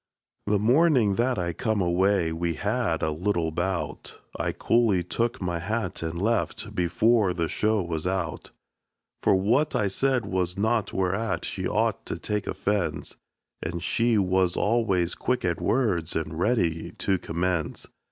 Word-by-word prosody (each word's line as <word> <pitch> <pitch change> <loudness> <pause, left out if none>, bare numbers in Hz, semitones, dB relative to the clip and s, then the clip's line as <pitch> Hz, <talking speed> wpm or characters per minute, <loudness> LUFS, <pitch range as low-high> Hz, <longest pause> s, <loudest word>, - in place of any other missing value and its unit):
The 105 0 +3
mornin' 125 - +4
that 125 +1 +1
I 85 -2 -1
come 110 +5 -1
away, 90 -1 +2
we 85 0 -1
had 100 -2 -1
a 80 - +1
little 85 0 -1
bout; 85 -3 -3 0.2
I - - -1
coolly 115 -6 +2
took 115 +6 -1
my 85 -2 -2
hat 105 +2 -3
and 80 +1 -3
left, 115 +4 -1
before 90 +3 +2
the 85 -2 0
show 110 +1 +1
was 85 -1 -3
out. 90 -4 -3 0.7
For - - +4
what 120 +11 +2
I 105 - +2
said 130 +2 +1
was 95 -2 -2
naught 110 0 +1
whereat 95 0 -1
she - - -3
ought - - 0
to - - -3
take 105 -1 -3
offense; 100 -3 -2 0.5
And 85 +1 -4
she 115 +2 +2
was 95 -2 +2
always 100 -6 +1
quick 125 -5 -1
at 85 -3 -1
words 95 - +1
and 80 0 -3
ready 90 -7 0
to 95 -2 0
commence. 85 -1 -2
95 Hz, 150 wpm, -26 LUFS, 85-110 Hz, 0.7 s, mornin